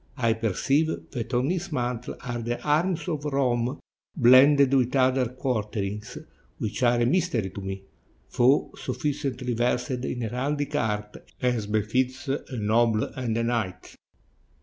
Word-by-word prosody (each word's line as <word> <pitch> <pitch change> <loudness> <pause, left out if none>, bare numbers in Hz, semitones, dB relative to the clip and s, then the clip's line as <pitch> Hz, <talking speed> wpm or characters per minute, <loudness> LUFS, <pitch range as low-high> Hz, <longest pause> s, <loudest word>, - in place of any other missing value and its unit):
I 115 -3 +2
perceive 115 - +1 0.2
that 115 0 -4
on 130 +6 +2
his 180 0 -3
mantle 125 -3 -3
are 120 -1 -4
the 120 +1 -3
arms 170 +4 +1
of 155 -4 -2
Rome 130 -2 0 0.4
blended 135 +2 +6
with 130 -1 +2
other 130 -1 +3
quarterings, 105 -5 -3 0.4
which 105 - -4
are 120 -1 +4
a - - +3
mystery 130 - +1
to 100 - -7
me, 95 0 -5 0.5
though 130 +3 +4
sufficiently 135 -4 -3
versed 120 +2 0
in 125 0 -3
heraldic 140 +6 -2
art, 105 -6 -2 0.2
as 120 -5 0
befits 125 +6 -1
a 135 - 0 0.2
noble 110 +1 +2
and 120 -4 -2
a 115 - 0
knight." 115 -6 -2
125 Hz, 140 wpm, -26 LUFS, 115-140 Hz, 0.5 s, blended